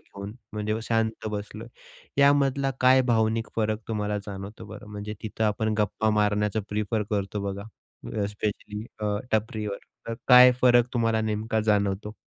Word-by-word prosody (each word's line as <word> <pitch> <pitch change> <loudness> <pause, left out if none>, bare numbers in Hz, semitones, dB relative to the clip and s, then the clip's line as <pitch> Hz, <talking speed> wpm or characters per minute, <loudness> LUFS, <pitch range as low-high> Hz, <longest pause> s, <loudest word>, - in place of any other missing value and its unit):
घेऊन 100 +1 -9 0.2
म्हणजे 105 0 -2
शांत 110 -1 -1
बसलोय. 105 +2 -6 0.5
यामधला 140 -1 +3
काय 130 +1 +6
भावनिक 110 0 +1
फरक 110 0 0
तुम्हाला 105 -1 -1
जाणवतो 100 +1 -7
बरं, - - -10
म्हणजे 105 +1 -6
तिथं 110 0 -2
आपण 110 +1 0
गप्पा 105 +1 +1
मारण्याचं 105 0 +1
प्रिफर 105 +1 -1
करतो 100 0 -2
बघा 100 +1 -6 0.6
अ, 100 - +1
स्पेशली 105 +1 -4 0.2
अ, 105 -1 0 0.2
टपरीवर. 105 -2 -1 0.3
तर 115 - -3
काय 125 0 +10
फरक 120 -1 +5
तुम्हाला 115 -2 +2
नेमका 110 0 -1
जाणवतो? 100 +1 0
110 Hz, 140 wpm, -26 LUFS, 105-115 Hz, 0.6 s, काय